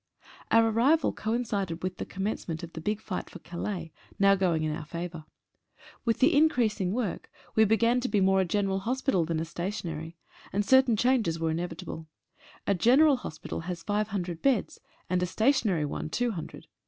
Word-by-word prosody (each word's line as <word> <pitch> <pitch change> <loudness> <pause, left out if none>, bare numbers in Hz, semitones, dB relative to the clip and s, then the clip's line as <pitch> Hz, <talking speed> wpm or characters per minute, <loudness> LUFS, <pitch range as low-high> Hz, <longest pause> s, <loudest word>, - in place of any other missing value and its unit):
Our 225 0 +5
arrival 270 +9 +3
coincided 210 -7 -2
with 185 0 -3
the - - -5
commencement 185 -4 -4
of 170 - -8
the 160 - -6
big 210 +5 -1
fight 215 -4 -5
for - - -10
Calais, 175 0 -5 0.3
now 195 0 +5
going 180 -5 +1
in 155 -1 -1
our - - -6
favour. 170 0 -6 0.8
With 230 -2 +2
the 275 +3 +4
increasing 230 - +2
work 220 -3 -3 0.2
we 220 - +5
began 230 +3 +3
to 250 +1 -2
be 210 - +2
more 190 0 +4
a - - +1
general 195 +1 0
hos 255 +7 -2
pital 185 - +2
than 165 -1 -1
a 165 - -2
stationary, 170 -2 -5 0.3
and 205 +1 0
certain 260 0 +5
changes 235 -9 +2
were 165 -1 0
inevit 165 0 -4
able. 160 0 -7 0.6
A 200 - +2
general 260 - +5
hospital 160 -10 -6
has 170 0 -5
five 210 0 0
hundred 180 -5 -4
beds, 265 -6 +1 0.3
and 180 0 0
a. 180 - +1
stationary 220 - +2
one 145 - -4
two 245 +7 0
hundred. 170 -7 -7
195 Hz, 185 wpm, -28 LUFS, 170-230 Hz, 0.8 s, Our